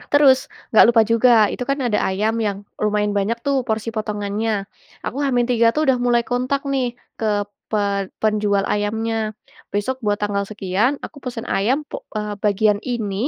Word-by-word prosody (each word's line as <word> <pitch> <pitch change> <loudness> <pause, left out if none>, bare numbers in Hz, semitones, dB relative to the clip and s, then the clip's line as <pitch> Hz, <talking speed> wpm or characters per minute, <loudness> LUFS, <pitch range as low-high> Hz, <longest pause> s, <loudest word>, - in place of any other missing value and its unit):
Terus, 275 -3 +4 0.2
nggak - - +9
lupa 230 -1 +5
juga, 230 +2 +4 0.2
itu - - -5
kan 275 - +1
ada 215 -3 +1
ayam 210 +4 0
yang 205 -2 -1 0.2
lumayan 210 -1 +1
banyak 205 +3 0
tuh 275 -2 +2
porsi 220 -2 -2
potongannya. 210 -1 -2 0.4
Aku 245 - -3
H-3 245 -3 +3
tuh 310 0 +1
udah 265 -2 +3
mulai 240 -1 +3
kontak 255 +3 -1
nih 255 -3 -1 0.2
ke 205 -2 0 0.2
pe 215 - +1 0.4
penjual 210 -2 +1
ayamnya. 220 +2 -1 0.6
Besok 205 +6 -1
buat 205 -1 +1
tanggal 205 -1 -1
sekian, 210 +7 0
aku 305 - -9
pesan 240 -3 -5
ayam 230 +8 +1
puk - - -7 0.2
eee, 210 0 -3
bagian 210 0 +3
ini 225 -6 -3
220 Hz, 165 wpm, -21 LUFS, 205-245 Hz, 0.6 s, nggak